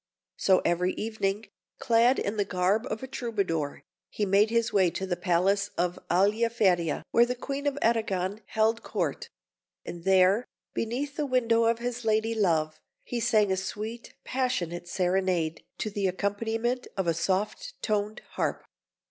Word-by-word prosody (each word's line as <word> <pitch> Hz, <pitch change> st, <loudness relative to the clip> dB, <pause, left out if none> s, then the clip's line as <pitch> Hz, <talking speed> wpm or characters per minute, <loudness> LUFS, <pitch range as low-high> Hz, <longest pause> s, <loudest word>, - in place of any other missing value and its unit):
So, 190 Hz, -1 st, +3 dB
every 175 Hz, +2 st, +1 dB
evening, 215 Hz, -1 st, -2 dB, 0.3 s
clad 235 Hz, +3 st, +4 dB
in 205 Hz, +2 st, -2 dB
the 205 Hz, -, +3 dB
garb 195 Hz, +6 st, 0 dB
of 220 Hz, +3 st, -4 dB
a -, -, -4 dB
Troubadour, 195 Hz, -, -2 dB, 0.3 s
he 210 Hz, -, -1 dB
made 200 Hz, +2 st, +4 dB
his 230 Hz, 0 st, +1 dB
way 190 Hz, -3 st, +4 dB
to 190 Hz, -, -4 dB
the 180 Hz, -2 st, -1 dB
palace 190 Hz, +3 st, +1 dB
of 175 Hz, 0 st, 0 dB
Aliaferia, 195 Hz, -3 st, +2 dB
where 235 Hz, +1 st, +5 dB
the 250 Hz, -, -2 dB
Queen 280 Hz, +3 st, -4 dB
of 285 Hz, -1 st, 0 dB
Arragon 210 Hz, -3 st, 0 dB
held 220 Hz, +1 st, +1 dB
Court; 470 Hz, -1 st, -3 dB, 0.6 s
and 170 Hz, -1 st, -7 dB
there, 190 Hz, +4 st, +4 dB, 0.3 s
beneath 270 Hz, +6 st, -3 dB
the 300 Hz, -2 st, 0 dB
window 230 Hz, -3 st, +3 dB
of 230 Hz, 0 st, +3 dB
his 240 Hz, 0 st, -4 dB
lady 220 Hz, +1 st, +1 dB
love, 160 Hz, -7 st, +1 dB, 0.2 s
he 240 Hz, -, -3 dB
sang 215 Hz, -3 st, +3 dB
a -, -, +3 dB
sweet, 215 Hz, +5 st, -5 dB
passionate 180 Hz, -10 st, -2 dB
serenade, 180 Hz, -3 st, 0 dB
to 215 Hz, -, -3 dB
the 200 Hz, -1 st, 0 dB
accompaniment 225 Hz, +6 st, -1 dB
of 190 Hz, -, 0 dB
a 170 Hz, -, +2 dB
soft 195 Hz, -, -1 dB
toned 210 Hz, 0 st, -1 dB
harp. -, -, -2 dB
210 Hz, 155 wpm, -28 LUFS, 185-230 Hz, 0.6 s, where